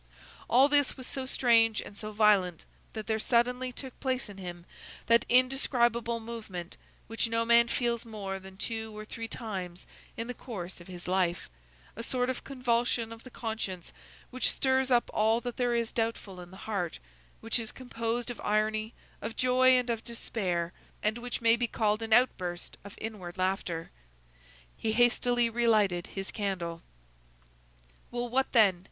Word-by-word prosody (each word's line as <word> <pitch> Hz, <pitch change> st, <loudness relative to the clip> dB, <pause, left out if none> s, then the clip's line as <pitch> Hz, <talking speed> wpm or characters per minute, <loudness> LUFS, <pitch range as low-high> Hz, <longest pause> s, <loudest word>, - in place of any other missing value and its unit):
All 260 Hz, +3 st, +6 dB
this 285 Hz, -1 st, +3 dB
was 255 Hz, -, -7 dB
so 265 Hz, 0 st, -3 dB
strange 230 Hz, -4 st, +4 dB
and -, -, -8 dB
so 215 Hz, +1 st, -5 dB
violent, 205 Hz, -5 st, +3 dB, 0.3 s
that 220 Hz, -1 st, -5 dB
there 220 Hz, -1 st, 0 dB
suddenly 250 Hz, +2 st, +1 dB
took 260 Hz, 0 st, -8 dB
place 260 Hz, -4 st, -1 dB
in 200 Hz, -1 st, -10 dB
him 175 Hz, -2 st, -7 dB, 0.4 s
that 230 Hz, 0 st, +4 dB
indescribable 240 Hz, -2 st, +3 dB
movement, 215 Hz, -6 st, -7 dB, 0.3 s
which 225 Hz, +1 st, 0 dB
no 230 Hz, 0 st, +1 dB
man 235 Hz, 0 st, +6 dB
feels 235 Hz, -1 st, 0 dB
more 200 Hz, -4 st, -5 dB
than 190 Hz, 0 st, -13 dB
two 220 Hz, 0 st, -4 dB
or 215 Hz, -, -6 dB
three 225 Hz, +1 st, -6 dB
times 185 Hz, -7 st, -6 dB, 0.3 s
in 230 Hz, -, -2 dB
the 250 Hz, -, -4 dB
course 190 Hz, -8 st, -7 dB
of 175 Hz, -, -13 dB
his 180 Hz, -1 st, -9 dB
life, 180 Hz, -, 0 dB, 0.4 s
a 230 Hz, -, -5 dB
sort 250 Hz, +2 st, 0 dB
of 255 Hz, -, -7 dB
convulsion 240 Hz, -3 st, 0 dB
of 225 Hz, -, -12 dB
the 255 Hz, -, -10 dB
conscience 220 Hz, -7 st, -4 dB, 0.4 s
which 255 Hz, 0 st, +2 dB
stirs 265 Hz, 0 st, +2 dB
up 245 Hz, -2 st, +3 dB
all 220 Hz, +2 st, +3 dB
that 245 Hz, -1 st, -5 dB
there 245 Hz, -2 st, +1 dB
is 230 Hz, -1 st, 0 dB
doubtful 225 Hz, -5 st, -2 dB
in 175 Hz, -, -11 dB
the 190 Hz, -, -12 dB
heart, 195 Hz, -6 st, -2 dB, 0.4 s
which 225 Hz, +2 st, -1 dB
is 225 Hz, -1 st, -2 dB
composed 240 Hz, -1 st, -3 dB
of 240 Hz, -, -8 dB
irony, 215 Hz, +1 st, 0 dB, 0.3 s
of 225 Hz, +1 st, -5 dB
joy, 255 Hz, 0 st, +5 dB
and 250 Hz, -1 st, 0 dB
of 230 Hz, -1 st, -3 dB
despair, 180 Hz, -7 st, -2 dB, 0.3 s
and 215 Hz, +3 st, +1 dB
which 245 Hz, 0 st, -4 dB
may 230 Hz, 0 st, +6 dB
be 240 Hz, 0 st, 0 dB
called 215 Hz, -1 st, +1 dB
an 225 Hz, 0 st, -4 dB
outburst 185 Hz, -7 st, +2 dB
of 200 Hz, 0 st, -10 dB
inward 195 Hz, -5 st, -6 dB
laughter. 185 Hz, -3 st, -1 dB, 0.8 s
He 220 Hz, -, -1 dB
hastily 240 Hz, 0 st, +3 dB
relighted 215 Hz, -6 st, +2 dB
his 195 Hz, -1 st, -5 dB
candle. 180 Hz, -5 st, -3 dB, 1.3 s
"Well, 240 Hz, 0 st, -3 dB
what 265 Hz, +2 st, +1 dB
then?" 200 Hz, -7 st, +5 dB
225 Hz, 165 wpm, -30 LUFS, 195-240 Hz, 1.3 s, All